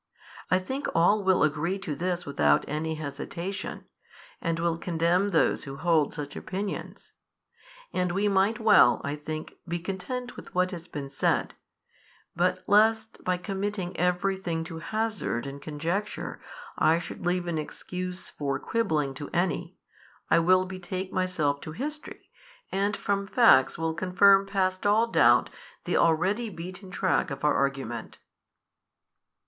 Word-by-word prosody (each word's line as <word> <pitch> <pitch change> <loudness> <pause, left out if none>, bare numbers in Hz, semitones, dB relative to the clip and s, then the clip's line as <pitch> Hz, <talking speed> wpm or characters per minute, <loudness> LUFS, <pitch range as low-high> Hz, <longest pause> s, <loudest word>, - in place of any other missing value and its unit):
I 185 - +4
think 260 +10 -3
all 200 +5 +4
will 190 -1 +4
agree 155 +5 0
to 185 -6 -4
this 175 +2 -2
without 75 - +2
any 160 +2 -2
hesitation, 170 +5 -5 0.6
and 165 -1 -1
will 165 0 0
condemn 175 +3 +1
those 170 - +2
who 135 0 -7
hold 160 -2 +2
such 145 -2 -6
opinions. 195 +2 -5 0.8
And 180 -1 0
we 200 +3 +1
might 200 +3 +2
well, 220 -2 +6
I 145 0 -2
think, 155 +1 -6
be 170 +1 -1
content 200 +8 -5
with - - -12
what 185 0 +2
has 170 -2 -7
been 140 -4 -6
said, 135 - +1 0.8
but 180 +2 +1
lest 220 +2 +3
by 185 0 +1
committing 195 -1 -3
every 180 +2 +1
thing 170 -4 -3
to 165 0 -7
hazard 215 - -2
and 140 +1 -7
conjecture 165 +8 -3 0.4
I 160 +1 +4
should 170 - -7
leave 175 0 0
an 170 -2 -1
excuse 180 +4 -6
for 140 -2 -3
quibbling 155 -12 0
to 140 +2 -7
any, 175 0 -1 0.6
I - - +6
will 185 +2 +4
betake 185 0 -5
myself 155 -6 0
to 155 - -7
history, 300 - -7 0.4
and 200 +1 0
from 200 0 -1
facts 135 - +5
will 165 0 -1
confirm 195 +3 +4
past 185 -1 0
all 215 +3 +4
doubt 230 - +4 0.3
the - - 0
already 190 +8 +2
beaten 185 +1 -8
track 185 0 +1
of 135 -1 -6
our 150 - +4
argument. 135 -4 -2
180 Hz, 145 wpm, -27 LUFS, 160-195 Hz, 0.8 s, well